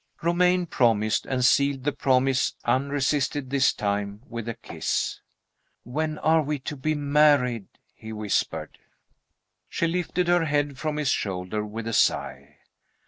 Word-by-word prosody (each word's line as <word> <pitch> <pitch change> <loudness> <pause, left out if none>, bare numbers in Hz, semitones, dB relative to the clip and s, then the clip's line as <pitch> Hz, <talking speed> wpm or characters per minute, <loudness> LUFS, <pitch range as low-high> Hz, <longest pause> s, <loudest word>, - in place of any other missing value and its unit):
Romayne 180 +1 +3
promised, 115 -8 +1
and 125 -1 0
sealed 140 -1 +3
the 145 - +1
promise 130 0 +1
unresisted 140 +1 0
this 140 -2 +4
time 100 +1 -3
with 115 -1 -5
a 115 - -4
kiss. - - -3 0.6
"When 155 +5 -3
are 160 +1 +3
we 150 0 -2
to 150 +3 -5
be 155 +3 -1
married?" 145 -6 +3 0.3
he 110 - -10
whispered. 105 -2 -2 0.9
She - - -1
lifted 175 +1 -1
her 175 -1 +3
head 145 -3 -1
from 155 -1 -2
his 150 -3 0
shoulder 95 -1 -2
with 110 +2 -6
a 115 - -3
sigh. - - 0
135 Hz, 140 wpm, -25 LUFS, 115-150 Hz, 0.9 s, this